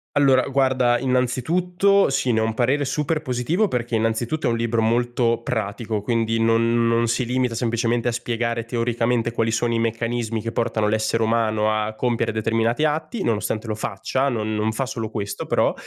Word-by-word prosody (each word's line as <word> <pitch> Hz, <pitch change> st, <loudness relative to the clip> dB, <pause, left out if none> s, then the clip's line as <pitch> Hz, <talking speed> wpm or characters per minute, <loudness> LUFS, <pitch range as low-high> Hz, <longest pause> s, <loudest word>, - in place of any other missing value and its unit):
Allora 135 Hz, -3 st, +4 dB
guarda, 130 Hz, -3 st, +2 dB
innanzitutto 165 Hz, +11 st, +1 dB
sì, 135 Hz, -2 st, +1 dB
ne 110 Hz, -, +2 dB
ho -, -, +1 dB
un 110 Hz, -, 0 dB
parere 130 Hz, +5 st, +1 dB
super 150 Hz, +3 st, -1 dB
positivo, 155 Hz, -, 0 dB
perché 120 Hz, -4 st, -2 dB
innanzitutto 115 Hz, +7 st, 0 dB
è -, -, +2 dB
un 115 Hz, -, 0 dB
libro 115 Hz, 0 st, 0 dB
molto 120 Hz, +1 st, +1 dB
pratico, 110 Hz, -1 st, -3 dB
quindi 115 Hz, 0 st, 0 dB
non 115 Hz, +1 st, +2 dB
non 115 Hz, 0 st, +2 dB
si 115 Hz, +3 st, 0 dB
limita 125 Hz, 0 st, 0 dB
semplicemente 115 Hz, 0 st, 0 dB
a -, -, 0 dB
spiegare 115 Hz, 0 st, -2 dB
teoricamente 115 Hz, 0 st, 0 dB
quali 115 Hz, -1 st, -1 dB
sono 120 Hz, +1 st, 0 dB
i 115 Hz, -, +1 dB
meccanismi 115 Hz, 0 st, -2 dB
che 115 Hz, -, -3 dB
portano 110 Hz, -2 st, 0 dB
l'essere 110 Hz, +1 st, 0 dB
umano 110 Hz, -1 st, +1 dB
a 110 Hz, 0 st, -1 dB
compiere 120 Hz, -1 st, -1 dB
determinati 115 Hz, +4 st, 0 dB
atti, 155 Hz, +9 st, -1 dB
nonostante 110 Hz, -, -1 dB
lo 110 Hz, -, -2 dB
faccia, 120 Hz, +7 st, -2 dB
non 110 Hz, -4 st, -2 dB
non 110 Hz, +1 st, 0 dB
fa 125 Hz, +5 st, -2 dB
solo 120 Hz, -4 st, -5 dB
questo, 100 Hz, -2 st, -4 dB
però. -, -, +2 dB
115 Hz, 180 wpm, -22 LUFS, 115-125 Hz, -, Allora